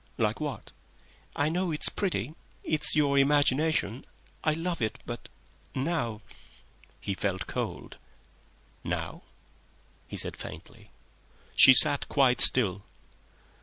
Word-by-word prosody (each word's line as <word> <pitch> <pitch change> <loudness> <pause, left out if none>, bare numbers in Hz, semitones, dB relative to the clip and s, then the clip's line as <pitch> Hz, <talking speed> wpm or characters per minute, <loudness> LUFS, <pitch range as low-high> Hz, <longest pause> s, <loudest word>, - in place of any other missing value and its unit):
"Like 110 -2 -1
what?" 145 -3 -6 0.6
"I 145 +1 0
know 180 +2 -2
it's 155 -2 +4
pretty—it's 160 -3 -3
your 140 -2 +2
imagination. 145 -3 +1 0.4
I 155 - +1
love 165 0 -4
it, 110 -1 -3
but - - -9 0.5
now—" 130 -7 -3 0.8
He 100 - -4
felt 95 -1 -4
cold. - - -6 0.9
"Now?" - - -5 0.9
he - - -8
said, - - -2
faintly. - - -12 0.7
She 130 - +10
sat 145 0 +6
quite 130 -3 +2
still. 100 -6 +3
140 Hz, 105 wpm, -27 LUFS, 120-155 Hz, 0.9 s, She